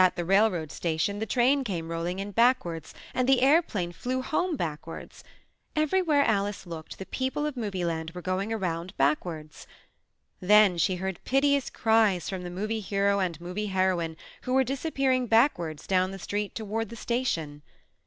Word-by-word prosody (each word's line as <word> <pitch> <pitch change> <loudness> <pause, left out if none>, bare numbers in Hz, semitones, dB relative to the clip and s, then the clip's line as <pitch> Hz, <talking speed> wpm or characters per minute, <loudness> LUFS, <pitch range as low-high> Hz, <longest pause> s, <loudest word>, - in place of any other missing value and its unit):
the 175 - -3
railroad 190 -4 +2
station 170 +5 -1
the 220 - -3
train 260 +5 +3
came 170 -8 -4
rolling 170 +2 -2
in 200 +1 -4
backwards 215 - +1 0.2
and 255 0 +1
the 265 -2 +5
airplane 265 - +3
flew 255 +8 -3
home 355 +4 0
backwards. 165 - -6 0.5
Everywhere 310 -1 +3
Alice 205 -4 0
looked, 165 -3 -8
the 190 - -7
people 260 +6 -2
of 300 -2 -3
Movie 200 -7 -2
Land 160 -1 -2
were 180 - -5
going 190 +3 -1
around 180 -4 -3
back 140 +3 +2
wards. 155 -3 -8 0.7
Then 200 -2 +5
she 185 +3 +2
heard 190 0 -4
piteous 280 +1 +2
cries 220 -5 +2
from 190 -2 -4
the 180 - -6
Movie 215 +5 -2
Hero 200 0 +1
and 180 -3 -1
the 170 - -14
Movie 190 +4 -3
Heroine 185 -4 0 0.2
who 255 - -1
were 265 - +5
disappearing 265 -1 0
backwards 175 - +2
down 185 -1 +2
the 195 - -7
str<vt 205 +2 -3
toward 220 0 -3
the 230 - -8
station. 195 - -2
200 Hz, 170 wpm, -27 LUFS, 175-245 Hz, 0.7 s, the